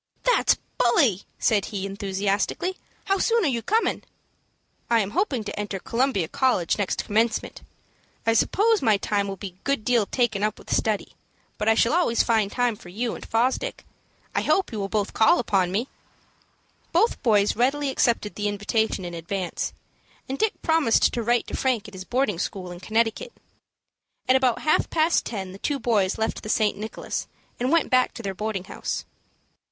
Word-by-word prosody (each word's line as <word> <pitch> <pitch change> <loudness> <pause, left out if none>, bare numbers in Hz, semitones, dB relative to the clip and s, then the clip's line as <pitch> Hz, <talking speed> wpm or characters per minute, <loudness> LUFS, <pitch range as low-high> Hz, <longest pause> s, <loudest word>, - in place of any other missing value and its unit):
"That's - - +3 0.2
bully," 235 -5 +3
said 205 -3 +2
he, 195 -3 -4
enthusiastically. 200 - -1 0.3
"How 390 -1 +1
soon 460 +1 +2
are - - +3
you 240 -4 0
comin'?" 445 - 0 0.9
"I 235 -1 +4
am 200 -2 -1
hoping 270 - 0
to 210 - -6
enter 205 -1 -3
Columbia 230 -3 0
College 215 -5 +1
next 200 - -1
commencement. 220 +2 0 0.6
I 225 - +3
suppose 425 - +3
my 215 -2 +4
time 200 0 -1
will 195 - -4
be 195 +1 -6
a 180 +1 -27
good 275 -6 -1
deal 235 -5 +2
taken 235 -6 0
up 210 0 0
with - - -2
study, 215 -2 -1 0.5
but 215 - +2
I 225 - +5
shall 230 +4 +3
always 325 -9 +3
find 220 -4 +1
time 245 -2 +1
for 175 - -13
you 230 +6 -2
and - - -8
Fosdick. 255 - -1 0.5
I - - +1
hope 385 - +1
you 220 - -4
both 210 -1 0
will - - -16
call 220 - +5
upon 195 -6 +1
me." 220 +7 -1 1.0
Both 405 +8 +2
boys 210 -5 +3
readily 275 +4 +1
accepted 230 -5 +1
the 210 0 -2
invitation 205 -1 -1
in 175 - -6
advance, 175 +2 -3 0.6
and 265 - -3
Dick 440 -1 0
promised 320 -8 +3
to 240 - -1
write 240 +1 +1
to - - -5
Frank 245 -5 0
at 210 - -12
his 190 0 -8
boarding 245 -8 0
school 185 -1 -4
in 175 - -8
Connecticut. 225 - -1 0.9
At 255 - +5
about 260 -3 +2
half 310 - +2
past 325 +1 +2
ten, 195 -5 -5
the 195 - -11
two 290 +5 -1
boys 210 -7 +1
left 220 0 -2
the 215 - -7
St. 215 -1 +2
Nicholas, 215 +2 -5 0.3
and 250 +3 0
went 335 -1 +2
back 255 0 +3
to 235 - -7
their 195 -1 -3
boarding 210 -1 -3
house. - - -4
225 Hz, 180 wpm, -25 LUFS, 200-260 Hz, 1.0 s, I